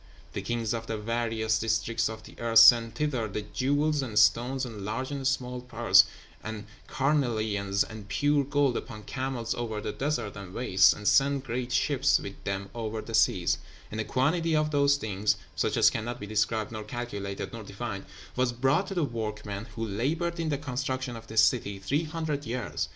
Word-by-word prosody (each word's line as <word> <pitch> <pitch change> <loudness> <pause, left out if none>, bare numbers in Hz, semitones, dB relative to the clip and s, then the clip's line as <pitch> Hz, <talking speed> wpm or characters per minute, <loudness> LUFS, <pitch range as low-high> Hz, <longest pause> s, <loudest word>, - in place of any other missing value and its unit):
The - - -3
kings 115 -2 -2
of 115 -1 -4
the 110 - -2
various 110 0 0
districts 115 +1 0
of 110 0 -8
the - - -13
earth 115 -1 +1
sent 115 0 +8
thither 130 -5 -1
the 105 0 -4
jewels 145 +7 0
and 115 -6 -4
stones, 125 +5 +3
and 110 -4 -8
large 130 +7 -3
and 135 -2 -2
small 125 -2 -1
pearls, 115 -6 +5 0.4
and 110 -1 -6 0.2
carnelian 110 -8 0 0.2
and 110 -2 -9
pure 145 +6 +2
gold, 140 -2 +1
upon 110 -4 -7
camels 130 -1 -3
over 115 -3 -3
the 105 - -3
deserts 135 -5 -2
and 100 -2 -9
wastes, 95 -6 +5
and 105 - -5
sent 140 0 +4
great 125 0 -3
ships 135 +2 +3
with 100 - -8
them 100 0 -3
over 110 -1 -4
the 115 - -8
seas; 90 -5 +3 0.3
and 110 - -2
a - - -1
quantity 160 +7 +1
of 155 0 +1
those 140 -1 +4
things, 105 -4 0 0.2
such - - 0
as - - +6
cannot 115 +2 -4
be 105 - -6
described 110 +1 0
nor 110 -1 -5
calculated 105 -4 -5
nor 115 - -6
defined, 100 0 -6 0.3
was 125 -1 +1
brought 135 +9 +1
to 195 - -5
the 175 - +1
workmen, 105 -4 -4
who 115 -1 -3
laboured 160 - -1
in 165 -1 -1
the 145 - 0
construction 130 -2 -3
of 115 0 -10
this 110 0 +4
city 100 -1 +1
three 140 +12 -1
hundred 155 -2 -3
years. 115 - -3
115 Hz, 190 wpm, -28 LUFS, 110-135 Hz, 0.4 s, sent